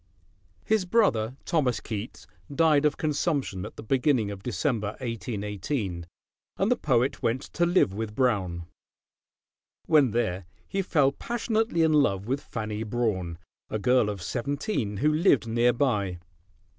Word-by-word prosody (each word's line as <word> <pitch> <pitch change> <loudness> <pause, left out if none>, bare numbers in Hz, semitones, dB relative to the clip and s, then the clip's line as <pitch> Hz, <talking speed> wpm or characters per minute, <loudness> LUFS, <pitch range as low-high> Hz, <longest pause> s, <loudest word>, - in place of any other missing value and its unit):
His 220 -3 +2
brother 135 - +2
Thomas 135 -8 +1
Keats 110 +1 -6 0.3
died 150 -1 +3
of 150 - +2
consumption 145 - -1
at - - -13
the - - -9
beginning 125 -3 +1
of 100 -1 -8
December, 115 -3 -1
1818, 105 - -4 0.5
and 195 +5 +1
the - - +5
poet 130 - +1
went 120 +3 0
to 175 0 +2
live 175 - +3
with 105 0 -4
Brown. 95 -10 0 1.2
When 150 -5 +5
there 95 -5 -1 0.2
he 195 0 -1
fell 145 -7 +3
passionately 225 - 0
in 160 -1 +3
love 100 -10 +2
with 135 +5 -1
Fanny 110 -4 -5
Brawne, 105 -7 -2 0.3
a 110 - -1
girl 125 0 +3
of 100 -4 -5
seventeen, 130 - -2
who 150 +7 +2
lived 155 - +3
nearby. 115 -5 +1
120 Hz, 135 wpm, -27 LUFS, 105-150 Hz, 1.2 s, the